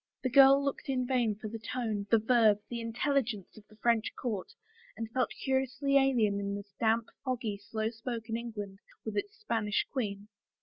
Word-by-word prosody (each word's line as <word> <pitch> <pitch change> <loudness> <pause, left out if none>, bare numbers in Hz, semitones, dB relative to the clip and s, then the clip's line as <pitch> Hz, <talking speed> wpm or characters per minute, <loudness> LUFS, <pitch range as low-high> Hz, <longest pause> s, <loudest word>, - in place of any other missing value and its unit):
The 255 - 0
girl 275 +1 +7
looked 280 0 -3
in 255 -2 +1
vain 245 -4 +1
for 215 +1 -7
the 225 +1 -6
tone, 220 -3 -3
the 230 - +6
verve, 220 -2 +4
the 235 -1 -3
intelligence 230 -3 -1
of 215 -1 -15
the 215 - -19
French 225 0 +1
court 215 -7 -3 0.5
and 225 - -3
felt 255 0 +1
curiously 265 +1 +1
alien 240 -7 +4
in 200 0 -2
this 200 -1 -9
damp, 225 0 +2 0.2
fc^gy, 235 -6 -2
slow 220 +2 -2
spoken 225 -1 -4
England 210 -4 -5 0.3
with 220 -2 -4
its 410 - -3
Spanish 225 - 0
queen. 205 -6 -3
230 Hz, 175 wpm, -31 LUFS, 210-255 Hz, 0.5 s, girl